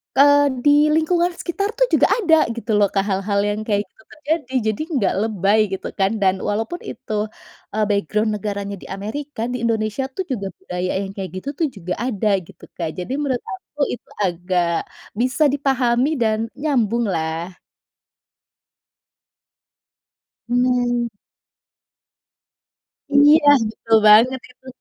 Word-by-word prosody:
eee, 285 +1 +6 0.2
di 295 +1 +5
lingkungan 345 +2 +2
sekitar 400 +5 -3
tuh, - - +2
juga - - +4
ada 325 - +3
gitu 235 -1 -4
loh, 205 - +4
Kak, 195 0 0
hal-hal 200 +1 0
yang 205 +1 -1
kayak 205 -1 +1
gitu 220 - -23
terjadi. 300 -3 -3 0.2
Jadi, 215 - -6
nggak 205 -7 +1
lebay 205 0 +2
gitu 190 - -4
kan 195 +2 +3
dan 190 -1 +3
walaupun 225 - -2
itu, - - -8 0.6
eh, 215 - +2
background 210 +2 0
negaranya 200 -1 -4
di - - -12
Amerika, 225 +6 -6
di 250 - -2
Indonesia 220 +3 -1
tuh, 380 - -2
juga 200 -6 -2
budaya 180 +1 -4
yang 195 - -6
kayak 190 -2 -5
gitu 280 - -4
tuh 320 - +2
juga 180 -2 -4
ada 215 -3 -1 0.2
gitu, - - -18
Kak, 165 -2 -2
jadi 180 - -5
menurut 265 -4 -1
aku 375 -6 -11
itu - - -7 0.2
agak 180 -1 0 0.5
bisa 255 +5 +1
dipahami 265 -2 +1
dan 220 +1 0
nyambung 240 -6 0
lah. 165 -2 -2 3.0
Hmm. 245 -1 +1 2.1
Iya 290 +1 +6 0.2
betul 225 0 +1
banget 235 +5 +6
itu, 255 +1 -24
225 Hz, 135 wpm, -21 LUFS, 200-285 Hz, 3.0 s, eee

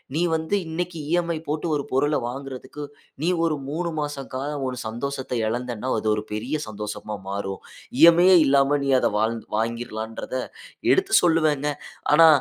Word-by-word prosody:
நீ 165 - +1
வந்து 160 +5 -1
இன்னக்கி 170 0 -3
இ.எம்.ஐ 170 -2 +1
போட்டு 150 +3 -2
ஒரு 145 - -1
பொருள 145 +3 +2
வாங்குறதுக்கு 135 +3 -7 0.4
நீ 175 - +2 0.2
ஒரு 155 -2 +1
3 170 +3 -2
மாச 145 -2 -3
காலம் 140 +1 -3
உன் 125 -1 -4
சந்தோஷத்த 130 +3 -4
இழந்தன்னா, 120 +1 -3
அது 110 - -1
ஒரு 105 - -3
பெரிய 125 +8 -2
சந்தோஷமா 105 0 -5
மாறும். 100 -1 -4 0.4
இ.எம்.ஐ 170 +2 +8
யே 185 - +8
இல்லாம 140 +1 +4
நீ - - 0
வாழ் 130 - +6
அதை - - +2
வாங்கிற் 115 0 -2
வாங்கிர்லான்றத 115 +1 -4 0.6
எடுத்து 390 +1 +2
சொல்லுவேங்க. 155 -4 +3 0.4
ஆனா, 165 +2 +8
140 Hz, 155 wpm, -24 LUFS, 115-160 Hz, 0.6 s, இ.எம்.ஐ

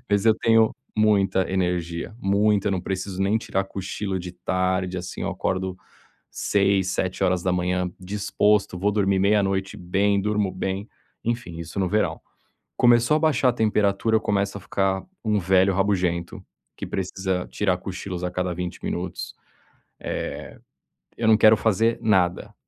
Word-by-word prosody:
mas 100 +2 +2
eu 110 - +6
tenho 115 0 +3 0.2
muita 100 -3 +2
energia, 90 0 -2
muita. 100 +1 +2
Não 95 -2 -1
preciso 95 0 -3
nem 105 +3 +2
tirar 95 -3 -2
cochilo 95 0 -4
de 90 0 -7
tarde 95 0 -1
assim. 90 +1 -6
Eu - - -2
acordo 95 0 -2 0.5
6h, 100 -2 +1
7h 90 -1 0
disposto. 100 0 +1
Vou 100 +3 +1
dormir 100 -2 +1
meia-noite 95 -1 +1
bem, 100 +3 +1
durmo 105 -2 0
bem. 95 +3 -3 0.4
Enfim, 115 -8 -3
isso 85 +4 -5
no 95 - +1
verão. 105 +3 0 0.6
Começou 120 +3 +4
a 155 - +3
abaixar 155 -5 +3
a 120 - -5
temperatura 105 0 +2
eu - - +2
começo 100 -1 -1
a - - -12
ficar 95 0 -1 0.2
um 105 -1 +2
velho 95 +1 +3
rabugento, 95 0 -1 0.3
que - - -5
precisa 95 -1 -2
tirar 95 -3 0
cochilos 95 -1 -6
a 90 - -1
cada 90 0 -1
20 90 0 -5
minutos. - - -4 1.8
Eh, 115 - -7
eu - - +3
não 110 -1 +6
quero 110 0 +7
fazer 115 +2 +1
nada. 95 -6 +1
95 Hz, 145 wpm, -24 LUFS, 90-105 Hz, 1.8 s, quero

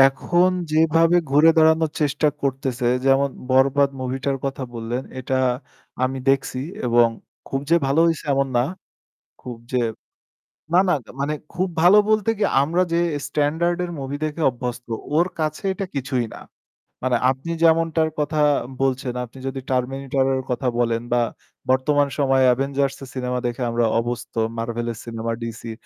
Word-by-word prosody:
এখন 175 +7 +4 0.2
যেভাবে 165 +2 +4
ঘুরে 150 +3 +6
দাঁড়ানোর 160 0 +4
চেষ্টা 150 +1 +2
করতেছে 135 -2 -1 0.2
যেমন 135 +1 +4 0.2
'বরবাদ' 140 +2 +3
মুভিটার 130 +2 -2
কথা 135 0 -3
বললেন 120 +3 -3 0.2
এটা 130 +1 -1 0.7
আমি 130 +1 -2
দেখছি 135 -1 0 0.3
এবং 120 -1 +5 0.4
খুব 135 - -2
যে 170 - +6
ভালো 140 +4 +2
হইছে 165 -1 0
এমন 135 0 +1
না। 120 - +3 0.8
খুব 125 -2 -7
যে 125 - +1 0.9
না, 180 - +6
না - - +4 0.3
মানে 150 +2 0 0.2
খুব 185 +2 0
ভালো 185 +5 +7
বলতে 215 0 +2
কি - - +1 0.2
আমরা 170 +5 +1
যে 170 - +2 0.3
স্ট্যান্ডার্ড 160 +4 0
এর 175 - -5
মুভি 135 +1 -4
দেখে 155 +2 -4
অভ্যস্ত 125 0 -6 0.3
ওর 170 +2 +4
কাছে 155 +4 -2
এটা 190 +1 -4
কিছুই 130 -2 -1
না। - - -10 0.6
মানে 130 -1 +2
আপনি 135 +5 -3
যেমনটার 160 -1 +3
কথা 150 +1 -1 0.4
বলছেন 130 -1 0
আপনি 120 +2 -17
যদি 135 0 -3
'Terminator' 135 +1 0
এর 130 - -1
কথা 125 +1 -1
বলেন 115 -1 +1
বা 120 - +3 0.5
বর্তমান 140 +2 +3
সময়ে 135 -2 +3
'Avengers' 135 +1 -1
এর 135 - -8
সিনেমা 125 -1 -2
দেখে 120 +2 -4
আমরা 115 0 +1
অভ্যস্থ 120 +1 -4 0.2
'Marvel'-এর 115 0 -3
সিনেমা, 115 -1 -4
'DC' 115 0 -6
135 Hz, 150 wpm, -22 LUFS, 125-155 Hz, 0.9 s, ভালো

